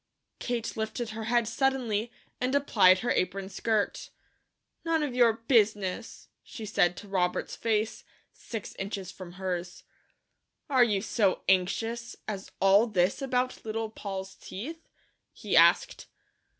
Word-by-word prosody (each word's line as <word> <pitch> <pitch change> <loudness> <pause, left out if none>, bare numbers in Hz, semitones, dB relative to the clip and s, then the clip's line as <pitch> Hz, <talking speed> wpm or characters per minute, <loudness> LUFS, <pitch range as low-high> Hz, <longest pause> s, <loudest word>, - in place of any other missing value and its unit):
Kate 235 -2 -3
lifted 220 +2 -3
her 220 0 -5
head 235 0 +2
suddenly, 240 -3 0 0.3
and 255 +2 0
applied 190 -10 +5
her 240 - 0
apron 190 +1 -1
skirt. 210 +1 -1 0.7
"None 325 -2 +1
of 285 -4 -2
your 240 -2 +5
business," 220 -3 0
she 225 - -9
said 180 -4 +2
to 205 - -9
Robert's 180 -2 -1
face, 220 -1 -1 0.3
six 225 -3 -7
inches 195 -1 -4
from 180 -2 -10
hers. 180 -1 -4 0.9
"Are 260 -2 +6
you 205 -4 +1
so 210 -4 +1
anxious 225 +6 0
as 200 -2 -5
all 195 +4 +5
this 190 +2 +1
about 255 -1 -1
Little 220 0 -3
Poll's 195 -3 -6
teeth?" 320 - -8 0.4
he - - -3
asked. - - +4
220 Hz, 130 wpm, -28 LUFS, 195-240 Hz, 0.9 s, Are